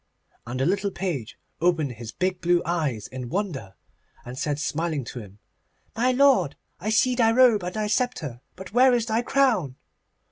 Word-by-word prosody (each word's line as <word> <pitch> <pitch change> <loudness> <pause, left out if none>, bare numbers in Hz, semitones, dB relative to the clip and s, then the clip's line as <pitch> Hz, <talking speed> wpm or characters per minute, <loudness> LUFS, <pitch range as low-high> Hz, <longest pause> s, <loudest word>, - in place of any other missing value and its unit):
And 125 +2 -4
the 135 - +1
little 200 +3 +1
page 170 - -4 0.2
opened 165 -5 +2
his 115 -1 -8
big 185 0 -2
blue 175 0 +2
eyes 150 - -1
in 130 -2 -7
wonder, 140 - -3 0.5
and 125 +1 -7
said 145 +2 -2
smiling 155 -1 -2
to 120 - -7
him, 100 -3 -12 0.6
'My 245 +3 +2
lord, 250 - +4 0.2
I 210 - -3
see 240 +3 +3
thy 230 -2 +3
robe 240 -3 +5
and 180 0 -5
thy 215 -1 -1
sceptre, 210 - -2
but 190 +1 -10
where 250 +1 +5
is 235 -2 0
thy 225 0 0
crown? 240 - +1
180 Hz, 175 wpm, -25 LUFS, 135-225 Hz, 0.6 s, robe